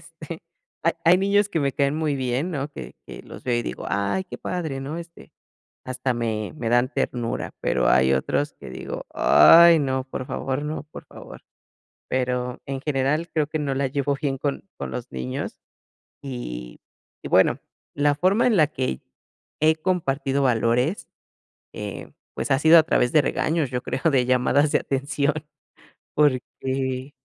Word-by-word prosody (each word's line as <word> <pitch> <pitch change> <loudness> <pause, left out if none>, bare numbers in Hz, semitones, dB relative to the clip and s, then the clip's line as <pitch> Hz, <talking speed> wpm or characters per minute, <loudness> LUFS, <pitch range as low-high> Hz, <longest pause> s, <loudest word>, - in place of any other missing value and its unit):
este, - - -10 0.4
hay - - +3
hay 175 +2 +6
niños 200 +1 +2
que 165 - -1
me 140 -1 0
caen 140 +1 +1
muy 155 -3 0
bien, 130 +6 -1
¿no? 140 -3 -3
Que - - -9
que - - -9
los - - -12
veo, 120 -1 +1
y - - -1
digo: - - -6
"Ay 100 - -1
qué 185 - -9
padre", 160 -7 -3
¿no? 145 +4 -5
Este, 170 0 -12 0.5
hasta 130 0 -2
me 110 -3 -3
me 115 -6 -3
dan 120 +1 +3
ternura, 120 -1 -2
pero, - - +1
hay 65 +1 +4
otros 145 - -1
que - - -9
digo: - - -6
"Ay, 165 - +7
no, 130 -2 -1
por 130 - -5
favor, 135 +2 -3
no, 150 +1 -4
por 150 - -12
favor", - - -12 0.7
pero, 125 -1 -1
en 135 -1 -4
general, 150 +3 0
creo 155 -2 +1
que 155 0 -3
no 140 -2 -1
la 135 0 0
llevo 140 +1 -1
bien 135 -2 -1
con 135 -8 -3
con 70 -2 -5
los - - -6
niños, 65 0 -5 0.6
y - - -7 0.4
y - - -6
bueno, - - +4 0.4
la 145 0 +2
forma 185 +9 +2
en 235 -4 +3
la 155 -4 +5
que 130 - -3 0.6
he 155 +1 +4
compartido 140 -6 0
valores, 125 - +1 0.7
eh, - - -7 0.2
pues, - - -3
ha 135 - +4
sido 160 +3 +7
a - - +4
través 125 -5 +1
de 155 - +5
regaños, 155 -1 0
yo 125 -1 -2
creo, 130 - -3
de 125 -2 +3
llamadas 130 +3 +2
de - - +4
atención, 140 +2 -1 0.8
porque 130 -1 0
135 Hz, 170 wpm, -24 LUFS, 125-155 Hz, 0.8 s, Ay